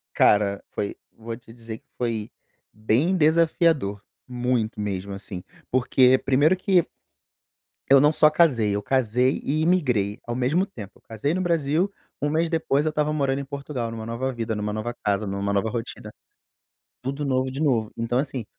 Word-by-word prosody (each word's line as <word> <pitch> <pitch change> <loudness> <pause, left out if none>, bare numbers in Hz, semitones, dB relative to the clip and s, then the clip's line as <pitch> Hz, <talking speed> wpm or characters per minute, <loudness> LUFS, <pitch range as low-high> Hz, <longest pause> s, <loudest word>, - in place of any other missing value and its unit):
Cara, 100 -1 +3
foi 100 - -3 0.2
vou 115 0 -6
te 115 -1 -16
dizer 115 -1 -8
que - - -44
foi 115 -3 -2 0.4
bem 120 - +1
desafiador, 160 - +2 0.2
muito 125 -3 -1
mesmo. 100 -1 -3
Assim, 95 -2 -7 0.3
porque 130 0 +4
primeiro 140 +7 +3
que 185 -2 +2 1.0
eu 135 0 +8
não 150 +1 +5
só 155 0 +5
casei, 125 -11 +3
eu 105 - -1
casei 125 +2 +1
e 155 +3 0
imigrei 125 - +1
ao 120 - -3
mesmo 140 +10 +1
tempo. 105 - -10
Eu - - -27
casei 115 +8 -2
no 185 - 0
Brasil, 170 +1 +1 0.3
1 145 - +1
mês 160 +2 +1
depois 160 -3 +1
eu - - +2
estava 150 0 0
morando 140 -2 0
em 140 - -5
Portugal 135 -4 -4
numa 110 -1 -6
nova 120 +3 -2
vida, 115 -1 -3
numa 105 0 -2
nova 110 +3 -3
casa, 100 0 0
numa 100 +1 -2
nova 100 +3 +1
rotina, 120 0 -5 0.9
tudo 140 +3 -3
novo 130 -1 +1
de 135 - -6
novo. 115 -8 +1
Então, 115 +2 0
assim, 130 -4 -3
125 Hz, 170 wpm, -24 LUFS, 110-150 Hz, 1.0 s, eu